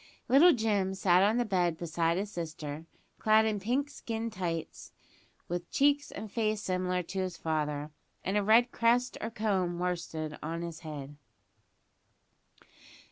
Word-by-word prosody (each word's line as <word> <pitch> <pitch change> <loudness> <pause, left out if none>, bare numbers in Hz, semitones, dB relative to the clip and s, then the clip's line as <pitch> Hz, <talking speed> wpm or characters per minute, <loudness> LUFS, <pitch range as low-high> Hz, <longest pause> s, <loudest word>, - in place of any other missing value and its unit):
Little 285 +8 +7
Jim 205 - +1
sat 185 -2 +4
on 210 +4 +3
the 245 - +1
bed 180 -5 +1
beside 165 0 0
his 205 +2 -3
sister, 160 -3 -6 0.3
clad 220 0 +5
in 215 -2 0
pink 250 +8 0
skin 230 -5 -4
tights, 170 -4 -4 0.6
with 175 0 -4
cheeks 285 +1 +2
and 215 -2 -7
face 215 -2 0
similar 180 -2 -1
to 190 +3 -5
his 185 -2 -2
father, 150 -2 -2 0.3
and 195 - 0
a 210 - +3
red 230 +4 +5
crest 240 +2 +2
or 225 - -2
comb 200 -6 0
of - - -6
worsted 165 -4 -3
on 165 +2 -4
his 170 -2 -6
head. 145 -3 -8
185 Hz, 150 wpm, -30 LUFS, 165-220 Hz, 0.6 s, Little